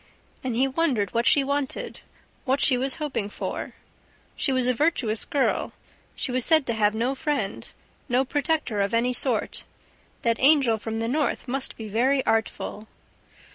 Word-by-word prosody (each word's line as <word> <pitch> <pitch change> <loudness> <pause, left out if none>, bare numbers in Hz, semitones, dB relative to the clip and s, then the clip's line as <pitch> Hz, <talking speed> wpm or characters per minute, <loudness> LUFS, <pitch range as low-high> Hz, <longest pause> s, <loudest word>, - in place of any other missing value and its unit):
And 255 -3 -2
he 260 +3 +3
wondered 265 - 0
what 235 0 +1
she 285 - +5
wanted. 280 0 -3 0.4
What 265 +1 +1
she 265 - +6
was 260 +2 0
hoping 280 -9 -3
for... - - -5 0.6
She 275 - +1
was 255 -1 +1
a 250 - +2
virtuous 240 -6 0
girl, 280 -2 0 0.4
she - - -2
was 255 0 +1
said 315 -1 +4
to 235 - 0
have 210 -1 +1
no 240 +4 0
friend, 275 -8 -3 0.4
no 250 +2 +2
protector 290 -6 -1
of 200 +3 0
any 245 +2 +1
sort... 245 -4 0 0.6
That 230 -1 +1
angel 265 -6 +4
from 225 +1 -4
the 230 - -1
North 285 +1 -1
must 265 +2 -1
be 220 - -7
very 260 +6 +1
artful! 220 -1 -2
255 Hz, 165 wpm, -25 LUFS, 225-280 Hz, 0.6 s, she